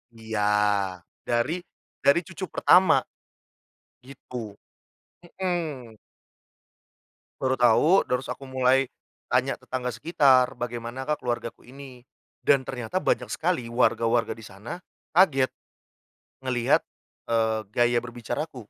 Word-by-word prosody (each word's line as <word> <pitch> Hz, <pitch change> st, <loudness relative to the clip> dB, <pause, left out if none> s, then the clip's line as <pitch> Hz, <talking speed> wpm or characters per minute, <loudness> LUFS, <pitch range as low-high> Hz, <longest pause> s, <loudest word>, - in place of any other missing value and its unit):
Iya, 110 Hz, -1 st, -4 dB, 0.9 s
dari 120 Hz, +9 st, 0 dB, 0.4 s
dari 140 Hz, +4 st, +5 dB
cucu 190 Hz, +2 st, -6 dB
pertama, 185 Hz, +1 st, +5 dB, 1.0 s
gitu. 125 Hz, -1 st, -11 dB, 1.0 s
Mhm. 155 Hz, -, -3 dB, 1.4 s
Baru 130 Hz, 0 st, +2 dB
tahu 130 Hz, +9 st, +5 dB
terus 125 Hz, +1 st, 0 dB
aku 135 Hz, -1 st, -12 dB
mulai, 130 Hz, 0 st, +2 dB, 0.4 s
tanya -, -, +2 dB
tetangga 125 Hz, -2 st, -4 dB
sekitar 130 Hz, -3 st, +3 dB
"Bagaimanakah 120 Hz, +4 st, -3 dB
keluargaku 120 Hz, -1 st, -4 dB
ini?" 135 Hz, -2 st, -11 dB, 0.4 s
Dan 135 Hz, -2 st, +3 dB
ternyata 125 Hz, +6 st, -4 dB
banyak -, -, 0 dB
sekali 160 Hz, -9 st, -1 dB
warga-warga 115 Hz, 0 st, +2 dB
disana 115 Hz, -, -9 dB, 0.3 s
kaget, 145 Hz, -8 st, +4 dB, 0.9 s
ngelihat, 125 Hz, -2 st, +2 dB, 0.5 s
eee, 110 Hz, -1 st, +2 dB
gaya 120 Hz, +1 st, +2 dB
berbicaraku. 120 Hz, +2 st, -5 dB
125 Hz, 95 wpm, -26 LUFS, 120-140 Hz, 1.4 s, dari